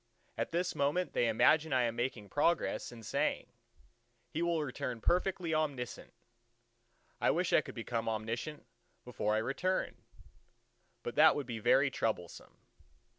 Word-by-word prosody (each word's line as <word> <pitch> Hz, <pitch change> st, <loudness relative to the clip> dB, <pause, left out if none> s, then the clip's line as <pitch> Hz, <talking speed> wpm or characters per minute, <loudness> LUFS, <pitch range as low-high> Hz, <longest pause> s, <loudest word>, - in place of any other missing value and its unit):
at -, -, -2 dB
this 175 Hz, +1 st, 0 dB
moment 145 Hz, +6 st, 0 dB
they 120 Hz, -, +2 dB
imagine 155 Hz, +7 st, +4 dB
I 130 Hz, -2 st, +3 dB
am 115 Hz, -1 st, -1 dB
making 120 Hz, -4 st, -3 dB
progress 165 Hz, -1 st, +1 dB
and 115 Hz, -2 st, -11 dB
saying, -, -, 0 dB, 0.9 s
He 160 Hz, -, -2 dB
will 170 Hz, -2 st, +1 dB
return 125 Hz, -3 st, -4 dB
perfectly 175 Hz, -, 0 dB
omniscient! 145 Hz, -6 st, -2 dB, 1.1 s
I -, -, +2 dB
wish -, -, +1 dB
I -, -, +6 dB
could -, -, -10 dB
become 115 Hz, -1 st, -2 dB
omniscient 115 Hz, +7 st, -4 dB, 0.4 s
before 110 Hz, -3 st, -1 dB
I -, -, +2 dB
return; 160 Hz, +12 st, -1 dB, 1.1 s
but 120 Hz, -, -4 dB
that 155 Hz, +1 st, +7 dB
would 145 Hz, -, -2 dB
be 120 Hz, -2 st, -5 dB
very 135 Hz, +5 st, +4 dB
troublesome. 105 Hz, -8 st, -3 dB
135 Hz, 140 wpm, -33 LUFS, 115-160 Hz, 1.1 s, that